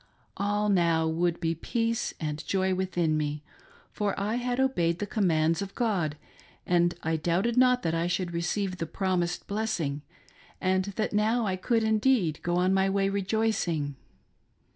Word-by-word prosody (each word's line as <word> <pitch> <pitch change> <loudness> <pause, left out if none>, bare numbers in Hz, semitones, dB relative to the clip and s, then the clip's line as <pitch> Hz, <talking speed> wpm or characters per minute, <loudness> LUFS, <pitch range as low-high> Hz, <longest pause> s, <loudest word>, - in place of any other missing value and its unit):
All 205 +1 0
now 170 -5 +3
would 170 +1 0
ise 165 0 +1
peace 230 -1 -1
and 150 0 -3
joy 190 -1 +1
within 180 -4 0
me, 150 0 -2 0.5
for 205 -2 -2
I 210 +4 -1
had 245 +1 -2
obeyed 175 -11 +1
the 205 - -3
commands 165 -5 +1
of 195 -1 -6
God, 185 - 0 0.5
and 175 0 +2
I 160 0 0
doubted 175 +9 0
not 250 0 +4
that 165 - 0
I 165 +1 0
should 175 0 -2
receive 185 +2 -1
the 165 - -2
promised 180 -1 -1
blessing, 200 -9 -2 0.6
and 185 0 +1
that 215 - -1
now 220 +3 +2
I 190 -2 0
could 225 +5 +1
indeed 220 - +2
go 175 0 -1
on 180 +2 +2
my 190 0 +3
way 195 0 +1
rejoicing. 195 -7 0
185 Hz, 160 wpm, -28 LUFS, 170-210 Hz, 0.6 s, not